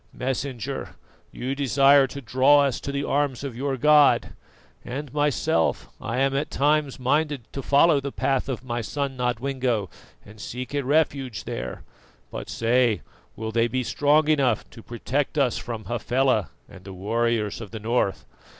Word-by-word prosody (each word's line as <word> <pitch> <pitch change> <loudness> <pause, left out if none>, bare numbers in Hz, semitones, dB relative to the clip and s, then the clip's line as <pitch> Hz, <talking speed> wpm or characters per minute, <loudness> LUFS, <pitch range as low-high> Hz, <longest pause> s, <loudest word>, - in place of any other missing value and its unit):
Messenger, 130 0 -4 0.4
you 130 +2 -4
desire 140 0 +4
to 140 +2 -8
draw 135 +5 +4
us 135 -4 0
to 140 - -5
the 140 0 -2
arms 140 -3 0
of 135 -4 -5
your 135 +2 -2
God 150 +2 +4 0.5
and 140 +2 -6
myself, 145 - +1
I 115 +2 -3
am 135 +1 +2
at 140 - -1
times 145 -1 +1
minded 145 +1 0
to 135 - -4
follow 145 +3 +4
the 140 0 -4
path 135 0 -1
of 125 -2 -4
my 120 -1 -3
son 140 +4 -3
Nodwengo 125 -4 -1 0.3
and 105 +1 -13
seek 125 +4 -6
a 145 -1 0
refuge 135 - 0
there 60 +1 -6 0.5
but - - -6
say, 115 - +1 0.3
will 110 +1 -4
they 115 +1 +2
be 130 +1 -2
strong 145 +4 +2
enough 140 -7 +2
to 115 - -12
protect 130 +6 -3
us 135 -4 +2
from 115 -3 -6
Hafela 120 - 0 0.2
and 95 - -14
the 95 0 -9
warriors 110 +2 -1
of 110 - -8
the 110 - -7
north? 110 -2 -1
130 Hz, 160 wpm, -24 LUFS, 115-140 Hz, 0.5 s, desire